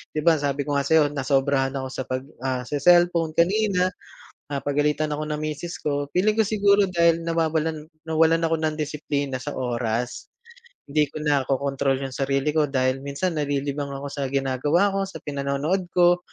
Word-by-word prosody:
'di 155 - 0
ba 165 -3 +4
sabi 140 0 -1
ko 145 -1 +1
nga - - -1
sa'yo, 155 -2 +4
nasobrahan 135 -1 +1
ako 130 -1 -3
sa 130 - -4
pag, 130 0 -3 0.2
ah, 130 -1 -1
se-cellphone 165 +3 +3
kanina, 185 0 +2 0.6
pinapagalitan 145 +2 0
ako 150 - -4
ng 150 - -3
misis 155 +3 -5
ko. 145 -1 -2
Feeling 210 +4 +2
ko 220 - +4
siguro 205 -1 +3
dahil 170 -2 +2
nawawalan, 160 -2 -1 0.2
nawalan 160 +1 +3
ako 165 0 +2
ng 155 -1 -1
disiplina 145 -3 -3
sa 145 +3 -5
oras. 120 -1 -2 0.6
Hindi 150 0 +3
ko 150 +2 -8
nakokontrol 140 -1 0
yung 135 - -4
sarili 135 +2 0
ko 150 0 +2
dahil 130 -1 0
minsan 155 +4 -2
nalilibang 140 -1 -2
ako 140 +1 -6
sa 140 -1 -3
ginagawa 140 +8 +1
ko, 195 0 -1
sa 165 -4 -10
pinanonood 145 +6 -1
ko. 175 0 +5
150 Hz, 165 wpm, -24 LUFS, 140-165 Hz, 0.6 s, ko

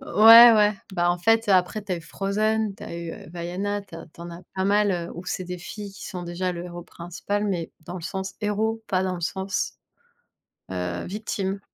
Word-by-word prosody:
Ouais, 230 -1 +9
ouais, 210 -1 +5 0.2
bah, 175 -1 +2
en 175 - -1
fait 225 +4 +3
après, 185 +2 +3
tu 195 -2 -4
as - - 0
eu - - -7
Frozen, 210 +4 -1
tu - - -13
as 170 - -6
eu, 170 -1 -5
heu, - - -10
Vaiana, 185 +4 -3
tu 195 - -14
as - - -9
tu - - -14
en 170 0 -7
as 170 - -9
pas 190 0 -1
mal, 205 +1 +3
heu, 170 -1 -3
où 175 +2 -8
c'est 185 - -3
des 180 0 -6
filles 200 +3 -8
qui - - -9
sont 180 -3 -6
déjà 175 +1 -2
le 170 0 -6
héros 175 -1 -7
principal, 180 +4 -4
mais 180 -5 -2
dans 175 +3 -8
le 170 - -7
sens 190 +2 -4
héros, 220 +2 -1
pas 185 -1 +1
dans 185 -1 -1
le - - -8
sens, 190 +3 -2 1.0
heu, 90 -1 -3
victime. 195 -1 -3
190 Hz, 225 wpm, -25 LUFS, 175-205 Hz, 1.0 s, Ouais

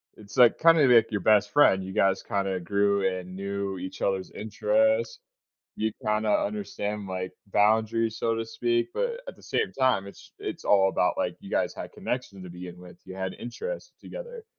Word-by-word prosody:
it's, 105 +4 -13
like, 120 -2 +6
kinda 165 -3 +6
like 115 -2 +5
your 100 -3 -1
best 105 0 +4
friend. 95 -10 +5
You 95 0 -7
guys 95 0 +2
kinda 100 -3 -2
grew 100 +2 +1
and 95 -1 -4
knew 100 0 -3
each 95 +1 -7
other's 95 -1 0
interests, 275 - +1 0.6
you 110 0 -1
kinda 105 0 +1
understand, 105 0 -2
like, 95 0 -4
boundaries, 110 +2 +2
so 115 - 0
to 115 0 -3
speak, 120 +3 0
but 485 0 -2
at - - -7
the - - -20
same 445 - -1
time, 130 -7 +1
it's 100 - -14
it's - - -6
all 95 -1 +5
about, 90 -1 +1
like, - - -1
you - - -11
guys - - 0
had - - -7
connection 115 -6 -5
to 90 - -9
begin 90 0 -9
with, 90 -1 -13
you - - -9
had 95 -1 -3
interest - - -6
together. 485 -2 -9
105 Hz, 185 wpm, -27 LUFS, 95-120 Hz, 0.6 s, like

